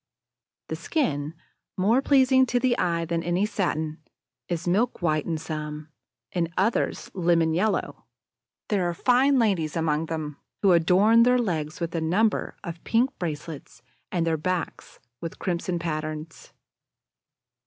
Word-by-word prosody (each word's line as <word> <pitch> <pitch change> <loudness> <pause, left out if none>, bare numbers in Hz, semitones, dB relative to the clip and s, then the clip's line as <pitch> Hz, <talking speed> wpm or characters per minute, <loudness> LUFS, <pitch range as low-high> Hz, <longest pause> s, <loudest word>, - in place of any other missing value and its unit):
The - - -2
skin, 155 - -1 0.4
more 220 +8 +3
pleasing 260 -2 +4
to 245 +1 +1
the 250 -1 +2
eye 170 -1 0
than 165 0 -1
any 175 +4 +1
satin, 160 -7 -2 0.5
is 175 0 -3
milk 200 +2 +1
white 155 -3 +1
in 165 -2 -1
some, 150 -1 -6 0.4
in 170 -2 -1
others 230 - 0
lemon 170 -3 +2
yellow. 200 +6 -1 0.6
There 190 -4 +1
are 170 - -4
fine 265 +6 +3
ladies 185 -10 +1
among 160 -1 0
them 155 -3 -4 0.3
who 195 - +6
adorn 185 +7 +5
their 250 +1 +5
legs 160 -10 -2
with 170 -1 -3
a 165 - -1
number 200 +7 +1
of 170 -3 -7
pink 245 +4 +2
bracelets 150 -6 -6 0.3
and 170 -2 0
their 165 -1 +1
backs 180 +1 -4 0.2
with 165 - -6
crimson 175 -1 -2
patterns. 155 -1 -5
170 Hz, 140 wpm, -26 LUFS, 160-210 Hz, 0.6 s, who